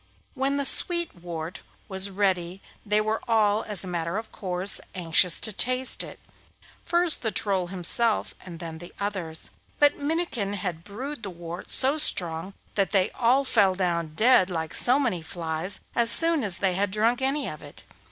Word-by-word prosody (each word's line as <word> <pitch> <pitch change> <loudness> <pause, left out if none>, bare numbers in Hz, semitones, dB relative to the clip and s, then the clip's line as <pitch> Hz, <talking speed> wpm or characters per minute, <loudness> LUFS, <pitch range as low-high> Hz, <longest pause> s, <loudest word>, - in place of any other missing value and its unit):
When 275 +1 -1
the 280 - 0
sweet 345 +4 +2
wort 170 -1 -7 0.3
was 190 0 -1
ready 190 -2 -1 0.2
they 210 0 +2
were 215 +1 -2
all, 215 -2 +2
as 205 -4 -1
a - - -7
matter 170 +1 -3
of 220 0 -7
course, 185 0 +1
anxious 170 0 +3
to 215 - 0
taste 255 +4 +1
it, - - -6 0.6
first 345 -1 +3
the 225 - -1
Troll 190 -4 0
himself 195 +5 +1
and 175 -3 -9
then 165 -2 -7
the 175 - -11
others; 185 -6 -3 0.3
but 290 0 +3
Minnikin 285 - -2
had 180 -5 -5
brewed 255 +8 -7
the 205 - -4
wort 175 0 -9
so 275 +4 +2
strong 175 - +1 0.2
that 195 -2 0
they 190 -2 +1
all 255 +3 +2
fell 200 -7 +3
down 170 -4 -2
dead 220 -2 +5
like 160 -3 -4
so 250 +2 +2
many 235 - -1
flies 165 +2 -4 0.2
as 235 -1 +3
soon 330 +2 +5
as 195 -5 +4
they 190 -2 0
had 200 +2 0
drunk 225 +5 0
any 275 +1 0
of 155 - -7
it. 145 -8 -10
200 Hz, 175 wpm, -25 LUFS, 175-240 Hz, 0.6 s, dead